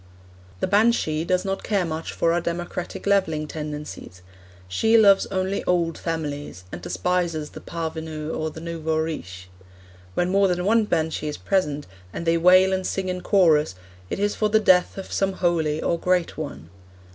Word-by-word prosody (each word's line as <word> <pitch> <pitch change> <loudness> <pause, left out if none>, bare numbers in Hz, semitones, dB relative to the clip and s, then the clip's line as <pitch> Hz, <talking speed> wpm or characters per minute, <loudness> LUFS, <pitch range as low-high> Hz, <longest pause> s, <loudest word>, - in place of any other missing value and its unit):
The - - +2
banshee 200 -6 +2
does 185 +2 0
not 195 0 -2
care 200 -4 0
much 160 0 -4
for 165 - +1
our 175 - +1
democratic 175 +1 -4
levelling 160 -7 +1
tendencies; 150 - -7 0.4
she 220 - +3
loves 200 -3 +6
only 190 +1 -1
old 170 -2 +1
families, 145 - -4
and 85 - -7
despises 155 - -1
the - - -10
parvenu 160 -2 -5
or 155 0 -2
the 160 - -10
nouveau 160 -1 -2
riche. 95 - -4 0.7
When 175 +1 +1
more 195 0 +4
than 180 -1 -1
one 220 +1 +4
banshee 160 -4 -1
is 150 - -4
present, 150 -7 0 0.3
and 170 - -5
they 165 0 +3
wail 185 +3 +6
and 185 0 -1
sing 190 -1 -2
in 180 0 -3
chorus, 160 - +3 0.3
it - - -3
is 205 +1 0
for 215 - 0
the 220 +1 +4
death 185 -4 +3
of 195 - -7
some 195 -1 +1
holy 160 -4 0
or 170 - 0
great 180 -1 +1
one. 75 +5 -7
170 Hz, 170 wpm, -24 LUFS, 155-190 Hz, 0.7 s, loves